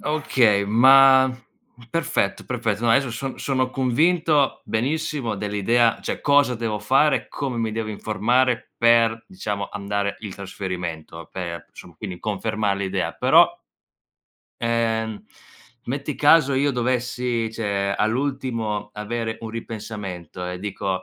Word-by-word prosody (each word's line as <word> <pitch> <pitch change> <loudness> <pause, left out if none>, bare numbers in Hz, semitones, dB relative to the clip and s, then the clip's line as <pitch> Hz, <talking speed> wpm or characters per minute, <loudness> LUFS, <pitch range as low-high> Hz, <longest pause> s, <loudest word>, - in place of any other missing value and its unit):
Okay, 130 -10 +2
ma 130 +4 +6 0.6
perfetto, 165 - -1
perfetto, 115 - -2
no 115 - +3
adesso 130 +2 +3
son 135 +3 -5
sono 130 -2 0
convinto, 150 +3 +2
benissimo 135 -1 -2
dell'idea, 105 +3 +1
cioè - - -4
cosa 140 -3 +3
devo 115 -2 -2
fare, 135 +7 +2
come 135 -4 -4
mi 110 -1 -1
devo 110 -1 -3
informare, 115 +4 0
per 115 -1 +3
diciamo, 105 - -4
andare 100 0 -2
il 100 -4 -7
trasferimento, 90 -4 -6
per, 85 -2 -6
insomma, 85 - -14
quindi 90 -1 -7
confermare 105 -1 -1
l'idea, 95 -1 -2
però, - - +5 1.1
ehm, 115 -2 -1 0.6
metti 140 +3 -3
caso 145 -1 +5
io 140 +2 +2
dovessi, 125 -2 -1
cioè 100 -3 -1
all'ultimo 115 -3 -2
avere 110 +2 -4
un 115 - -6
ripensamento, 105 -6 -7
e 90 0 -5
dico: 95 -2 -3
115 Hz, 120 wpm, -23 LUFS, 100-130 Hz, 1.1 s, ma